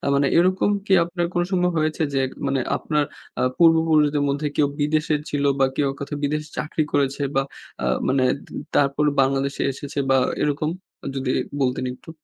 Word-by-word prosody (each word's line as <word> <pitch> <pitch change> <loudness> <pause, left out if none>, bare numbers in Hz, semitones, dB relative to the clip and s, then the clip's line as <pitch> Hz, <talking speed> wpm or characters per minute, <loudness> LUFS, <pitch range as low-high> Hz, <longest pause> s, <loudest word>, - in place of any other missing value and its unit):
মানে 140 0 +3
এরকম 185 +3 +3 0.2
কি 195 - +2
আপনার 175 +1 -2
কোন 175 - +1
সম্ভব 180 -1 +2
হয়েছে 155 +1 -1
যে 135 - +2 0.3
মানে 135 -1 +1 0.2
আপনার 150 -1 0 0.4
আ - - +1 0.2
পূর্বপুরুষদের 160 -3 +4
মধ্যে 145 +2 -1
কেউ 145 - +3
বিদেশে 155 +1 +1
ছিল 145 -1 -1 0.2
বা 135 - +5
কেউ 145 - +1
কোথাও 145 +1 -4
বিদেশে 150 +1 -1
চাকরি 155 +1 -1
করেছে 140 0 +1
বা 135 - +4 0.4
আ - - 0 0.2
মানে 130 0 +2 0.5
তারপর 140 +1 +2 0.2
বাংলাদেশে 135 +1 0
এসেছে 140 +1 -6
বা 135 - +5 0.3
এরকম 150 +1 0 0.5
যদি 135 -1 -2 0.3
বলতেন 130 0 0
একটু? 130 - -14
145 Hz, 160 wpm, -23 LUFS, 140-155 Hz, 0.5 s, বা